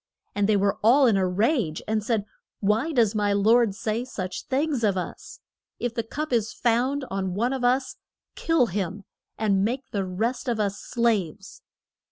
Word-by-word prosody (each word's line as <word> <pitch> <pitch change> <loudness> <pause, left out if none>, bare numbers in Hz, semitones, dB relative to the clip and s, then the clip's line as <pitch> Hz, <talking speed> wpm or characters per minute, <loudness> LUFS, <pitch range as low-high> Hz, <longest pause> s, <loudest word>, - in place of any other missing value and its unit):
And 205 0 0
they 210 - +4
were 200 0 +1
all 260 +6 +5
in 230 -5 +4
a 190 -1 +2
rage, 200 - 0
and 215 0 0
said: 215 -2 0 0.3
Why 220 +10 +1
does 230 -7 +3
my 205 -1 +1
lord 220 +1 +3
say 220 +3 -2
such 190 -7 -6
things 275 -2 0
of 200 -3 +2
us? 180 - -7 0.4
If 245 -1 -3
the 235 - -1
cup 295 +5 -5
is 225 -2 +1
found 255 +4 0
on 190 -2 -2
one 240 +6 0
of 260 -2 -3
us, 255 +2 +1 0.4
kill 330 -6 +2
him; 195 -1 -3 0.3
and 200 -3 +2
make 250 +5 -1
the 200 -2 -1
rest 225 +9 -2
of 235 -3 0
us 200 -1 -1
slaves. 205 -5 -1
220 Hz, 180 wpm, -25 LUFS, 200-245 Hz, 0.4 s, all